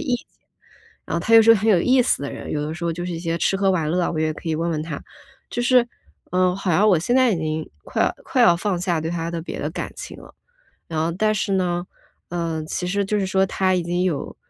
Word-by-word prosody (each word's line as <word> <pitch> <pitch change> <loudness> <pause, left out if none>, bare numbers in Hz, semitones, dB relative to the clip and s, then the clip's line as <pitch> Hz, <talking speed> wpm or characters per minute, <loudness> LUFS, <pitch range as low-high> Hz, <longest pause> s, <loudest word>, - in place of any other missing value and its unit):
意 280 -6 0
见。 - - -15 0.8
然 - - -4
后 - - 0
他 225 +6 +2
又 225 - +10
是 225 - +1
个 - - +2
很 215 +3 0
有 180 -5 +4
意 255 +4 +4
思 235 - 0
的 140 - -4
人， - - -7
有 150 - -1
的 155 +1 -4
时 170 - -6
候 170 - 0
就 175 +2 -5
是 180 - -3
一 165 - -4
些 165 0 -2
吃 195 - +1
喝 195 0 +2
玩 165 -5 0
乐 180 +2 +1
啊， - - 0
我 155 - -2
也 155 0 +1
可 165 - -7
以 - - 0
问 170 +1 -1
问 155 -2 -2
他。 165 - -6 0.5
就 - - -2
是， 250 0 +5 0.5
嗯， 180 0 +2
好 195 -2 -2
像 205 +7 +4
我 190 - +5
现 240 +10 +1
在 255 -3 +4
已 - - 0
经 155 0 -3 0.2
快 - - -1
要 - - 0
快 - - 0
要 170 -1 +6
放 185 -2 -1
下 175 -3 0
对 160 +1 -3
他 165 -1 -3
的 165 -1 -3
别 - - -6
的 - - -2
感 - - -5
情 - - -8
了， - - -14 0.6
然 160 -2 -3
后 165 +2 0
但 215 +4 +1
是 200 0 -1
呢， 175 -2 0 0.4
嗯， 165 -2 -3
其 180 +2 -3
实 200 +2 0
就 210 +1 0
是 195 - -1
说 190 0 +2
他 185 0 +1
已 180 - 0
经 175 +1 -1
有， 165 -7 -2
175 Hz, 300 characters per minute, -22 LUFS, 165-195 Hz, 0.8 s, 又